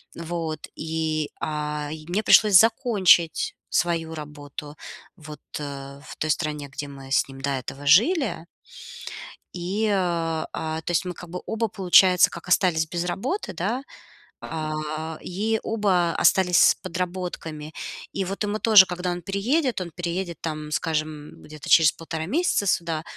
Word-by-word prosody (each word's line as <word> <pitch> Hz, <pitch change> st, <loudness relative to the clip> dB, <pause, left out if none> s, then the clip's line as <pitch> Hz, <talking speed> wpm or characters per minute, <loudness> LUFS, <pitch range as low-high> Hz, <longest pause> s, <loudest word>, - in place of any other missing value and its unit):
Вот. 165 Hz, -1 st, -4 dB
И, 160 Hz, -1 st, -2 dB
а, 150 Hz, -1 st, -3 dB
и 155 Hz, 0 st, -8 dB
мне 195 Hz, +5 st, -1 dB
пришлось 210 Hz, -1 st, +6 dB
закончить 205 Hz, -6 st, +4 dB
свою 165 Hz, -1 st, 0 dB
работу 150 Hz, -1 st, -9 dB, 0.4 s
вот, 155 Hz, -3 st, -11 dB, 0.2 s
э, 140 Hz, -1 st, -7 dB
в -, -, -11 dB
той 155 Hz, -, -2 dB
стране, 150 Hz, -2 st, -2 dB
где 145 Hz, +1 st, -6 dB
мы 135 Hz, -1 st, -11 dB
с -, -, +3 dB
ним 135 Hz, 0 st, -11 dB
до 140 Hz, -, -1 dB
этого 135 Hz, +1 st, -5 dB
жили. 220 Hz, -, +3 dB, 1.1 s
И, 190 Hz, +5 st, -1 dB
а, 170 Hz, -4 st, -1 dB
а 160 Hz, 0 st, -3 dB
то 170 Hz, -, -4 dB
есть 175 Hz, -, +2 dB
мы 180 Hz, -, -4 dB
как 175 Hz, 0 st, -11 dB
бы 180 Hz, +1 st, -6 dB
оба, 225 Hz, +1 st, -1 dB
получается, 185 Hz, -2 st, +5 dB
как 170 Hz, -, -9 dB
остались 170 Hz, -3 st, +2 dB
без 170 Hz, +2 st, -3 dB
работы, 200 Hz, -, -3 dB
да. 215 Hz, +10 st, -2 dB, 0.6 s
А, 155 Hz, 0 st, -4 dB
и 215 Hz, +5 st, -1 dB
оба 185 Hz, -6 st, +1 dB
остались 180 Hz, -2 st, +4 dB
с -, -, -1 dB
подработками. 175 Hz, -4 st, -5 dB, 0.4 s
И 195 Hz, -, -2 dB
вот 195 Hz, +3 st, -3 dB
ему 210 Hz, +1 st, -2 dB
тоже, 215 Hz, -4 st, +8 dB
когда 180 Hz, 0 st, -3 dB
он 175 Hz, 0 st, -4 dB
переедет, 230 Hz, -, 0 dB
он 175 Hz, -2 st, -6 dB
переедет, 175 Hz, +1 st, -4 dB
там 155 Hz, -2 st, -5 dB
скажем, 155 Hz, -1 st, -3 dB
где-то 155 Hz, -1 st, -10 dB
через 160 Hz, -3 st, +7 dB
1,5 160 Hz, -1 st, -5 dB
месяца 290 Hz, -, +1 dB
сюда, 165 Hz, -3 st, 0 dB
170 Hz, 150 wpm, -24 LUFS, 155-190 Hz, 1.1 s, тоже